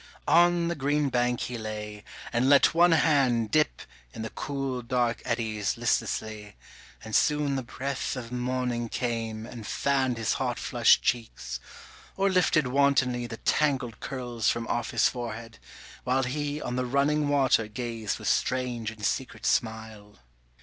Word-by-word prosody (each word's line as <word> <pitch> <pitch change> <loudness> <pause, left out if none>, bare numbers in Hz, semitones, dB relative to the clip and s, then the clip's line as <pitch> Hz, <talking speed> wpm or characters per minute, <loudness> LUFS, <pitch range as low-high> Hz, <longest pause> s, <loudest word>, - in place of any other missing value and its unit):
On 175 0 +4
the 170 - 0
green 145 -1 0
bank 125 -1 0
he 120 -2 -4
lay, 105 -1 -6 0.3
and 120 +3 +2
let 140 +2 +6
one 170 +1 +5
hand 135 -9 +3
Dip 155 -1 +1 0.3
in 110 - -5
the 110 - -5
cool 135 -3 -3
dark 120 -1 0
eddies 110 -3 -1
listlessly, 110 -3 -2 0.5
And 110 -1 -4
soon 150 -2 +2
the 135 - -1
breath 135 +3 -4
of 120 -2 -7
morning 125 -1 -2
came 115 -3 -3
and 115 -2 -9
fanned 135 -3 0
His 110 -2 0
hot - - -1
flushed - - +3
cheeks, 70 - -2 0.6
or 195 0 +2
lifted 175 -5 +3
wantonly 130 -2 +2
The 115 - -7
tangled 130 -8 0
curls 120 -4 -2
from 115 -1 -1
off 120 -1 -1
his 115 -2 +3
forehead, 115 -2 -6 0.4
while 130 +1 +1
He 145 +3 -2
on 125 -4 -4
the 125 - 0
running 145 +3 +2
water 135 -6 +3
gazed 115 -1 -4
with - - -6
strange 125 -3 0
and 110 -2 -6
secret 130 +4 -2
smile. 110 -3 -2
125 Hz, 150 wpm, -27 LUFS, 115-140 Hz, 0.6 s, let